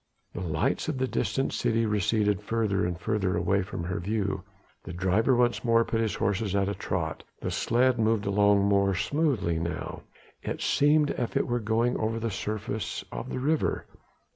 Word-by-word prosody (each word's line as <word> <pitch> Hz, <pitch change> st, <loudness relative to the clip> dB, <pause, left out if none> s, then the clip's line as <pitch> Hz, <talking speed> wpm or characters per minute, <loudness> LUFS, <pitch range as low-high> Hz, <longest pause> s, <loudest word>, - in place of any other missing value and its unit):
The -, -, -5 dB
lights 80 Hz, -3 st, -1 dB
of 155 Hz, -3 st, -2 dB
the 130 Hz, 0 st, 0 dB
distant 135 Hz, +1 st, -1 dB
city 115 Hz, 0 st, +1 dB
receded 105 Hz, -1 st, +1 dB
further 105 Hz, -5 st, 0 dB
and 90 Hz, -2 st, -4 dB
further 100 Hz, -5 st, 0 dB
away 95 Hz, +3 st, +2 dB
from 90 Hz, -2 st, -5 dB
her 90 Hz, 0 st, -3 dB
view, 100 Hz, 0 st, -1 dB, 0.4 s
the -, -, -7 dB
driver 95 Hz, +8 st, +2 dB
once 120 Hz, 0 st, +2 dB
more 115 Hz, -1 st, +4 dB
put 115 Hz, -, 0 dB
his 110 Hz, -2 st, 0 dB
horses 100 Hz, 0 st, 0 dB
at 100 Hz, -1 st, +2 dB
a 100 Hz, -, -1 dB
trot, 90 Hz, -4 st, -3 dB, 0.2 s
the -, -, -3 dB
sledge 125 Hz, +2 st, +2 dB
moved 110 Hz, -1 st, +1 dB
along 100 Hz, 0 st, +3 dB
more 100 Hz, -1 st, +3 dB
smoothly 125 Hz, -, 0 dB
now: 85 Hz, +1 st, -4 dB, 0.4 s
it -, -, -4 dB
seemed 145 Hz, +1 st, +3 dB
as 120 Hz, -, -2 dB
if -, -, -2 dB
it -, -, +1 dB
were 120 Hz, 0 st, 0 dB
going 115 Hz, +2 st, +1 dB
over 110 Hz, +1 st, -1 dB
the 115 Hz, 0 st, -2 dB
surface 110 Hz, +2 st, -4 dB
of -, -, -5 dB
the -, -, -3 dB
river. 150 Hz, +4 st, 0 dB
105 Hz, 185 wpm, -28 LUFS, 95-115 Hz, 0.4 s, more